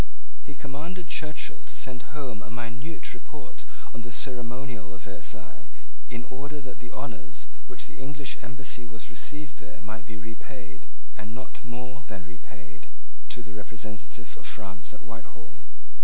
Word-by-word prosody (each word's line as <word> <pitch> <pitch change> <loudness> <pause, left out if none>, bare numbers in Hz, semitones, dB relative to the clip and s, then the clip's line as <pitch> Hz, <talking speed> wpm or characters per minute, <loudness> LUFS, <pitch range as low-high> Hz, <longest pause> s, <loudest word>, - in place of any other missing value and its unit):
He - - -4
commanded 160 +6 +1
Churchill 150 -1 +3
to - - -4
send 130 +1 0
home 125 -8 +2
a 105 - -4
minute 120 +7 +1
report - - -5 0.3
of 115 - 0
the 120 - -1
ceremonial 120 -5 +4
of 95 - -8
Versailles, 95 -1 0 0.4
in 120 0 +2
order 145 +3 +1
that 135 -2 -3
the 120 - -3
honours 120 - +1 0.2
with - - -27
which - - 0
the - - -5
English 140 -1 +3
embassy 125 -1 +1
was 110 0 0
received 150 +4 +2
there - - -5
might 110 0 -1
be 105 - 0
repaid, 110 - -4 0.3
and 110 +1 -1
not 130 - -3
more 125 +2 0
than 100 -5 0
repaid, 90 -4 -8 0.4
to 120 - +1
the 105 - -4
representative 110 +3 0
of - - -1
France 95 -3 +1
at 110 - -6
Whitehall. 115 0 -5
120 Hz, 155 wpm, -36 LUFS, 105-135 Hz, 0.4 s, ceremonial